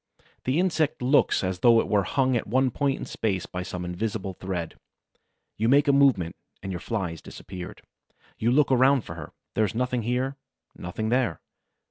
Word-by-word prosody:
The 130 +6 +1
insect 165 -8 +1
looks 135 -3 +3
as 95 -1 -2
though 115 +2 +6
it - - 0
were 105 -2 +3
hung 130 +2 +1
at 115 - -1
one 130 +4 +2
point 140 +2 0
in - - -6
space 95 -5 -2
by 90 - -5
some 90 0 -5
invisible 95 +2 -3
thread. 90 -3 -4 0.8
You 115 +2 +1
make 145 +3 +5
a 140 - +5
movement, 130 -12 +3 0.3
and 95 - -4
your 90 - -4
Fly 100 -7 -2
has 85 - -9
disappeared. 90 -2 -9 0.6
You 115 - +2
look 140 +2 +3
about 130 0 +4
for - - -8
her. 80 -3 -9 0.2
There 110 - +2
is 105 +1 -1
nothing 125 0 0
here, 125 +4 -1 0.4
nothing 110 +5 -4
there. 120 -7 +1
115 Hz, 185 wpm, -26 LUFS, 95-130 Hz, 0.8 s, though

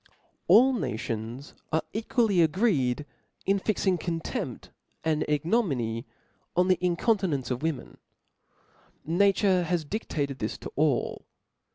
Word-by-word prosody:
ALL 240 +9 +7
nations 115 - -4 0.2
arc 160 0 +1
equally 220 -3 +2
agreed 150 - +2 0.4
in 195 0 +2
fixing 190 -3 +1
con 165 0 -2
tempt - - -5 0.3
and 155 -1 +1
ignominy 145 - 0 0.5
on 180 +1 +3
the 185 - +4
incontinence 175 - +1
of 125 - -2
women* 155 -5 -3 1.1
Nature 190 +2 +3
has 175 -2 -1
diftated 145 - -3
this 110 - -3
to - - -8
all. 145 -5 0
165 Hz, 110 wpm, -27 LUFS, 140-195 Hz, 1.1 s, ALL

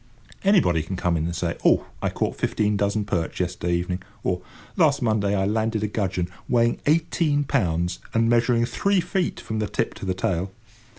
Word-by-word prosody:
Anybody 175 - +4
can 85 +5 -5
come 90 -1 0
in 80 -1 0
and 85 +1 -3
say, 85 0 -2
"Oh, - - +4 0.2
I - - +1
caught - - -2
fifteen 105 0 0
dozen 100 +1 0
perch 85 -6 -2
yesterday 90 -1 -1
evening;" 90 +1 -2 0.2
or 90 -1 0 0.3
"Last - - +3
Monday 105 -3 +1
I 95 -1 +1
landed 110 +1 0
a - - +1
gudgeon, 95 -4 -1 0.2
weighing 120 -1 +2
eighteen 155 -1 +2
pounds, 90 - 0
and 115 0 +2
measuring 120 0 +3
three 200 +9 +1
feet 180 0 -1
from 110 0 -4
the 105 - 0
tip - - -1
to - - -8
the 95 - 0
tail." 90 0 -1
100 Hz, 185 wpm, -24 LUFS, 90-115 Hz, 0.3 s, Anybody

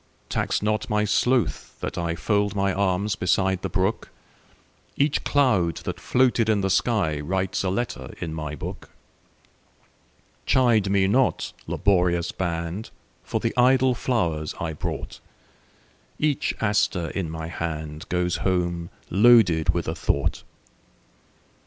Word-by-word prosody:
Tax - - -1
not 105 +2 0
my 105 -1 +1
sloth 120 +3 0
that - - -4
IFold 100 +4 -1
my 100 -1 +1
arms 100 +1 0
beside 95 +1 +1
the - - -3
brook; 95 +3 -1 0.9
Each 145 +1 +1
cloud 105 - +2
that - - -4
floated 125 -3 +2
in 105 -2 +2
the 95 - 0
skyWrites 95 -3 0
a 95 - 0
letter 120 +6 -3
in 80 -2 -4
my 75 -1 -4
book. - - -7 1.6
Chide 115 -6 +3
me 95 -1 +3
not, 125 +6 +1
laborious 90 -3 +1
band, 85 +3 -3 0.3
For - - -2
the - - -1
idle 130 +1 +4
flowers 85 - -1
I 80 -3 -3
brought; 75 - -5 1.0
Every 150 -3 +2 0.2
aster 100 -6 +1
in 95 -5 -3
my 80 0 -5
handGoes 85 +2 -3
home 85 -2 -1 0.2
loaded 100 -6 +5
with 85 0 +1
a 80 - -1
thought. 80 - -1
95 Hz, 120 wpm, -24 LUFS, 85-110 Hz, 1.6 s, loaded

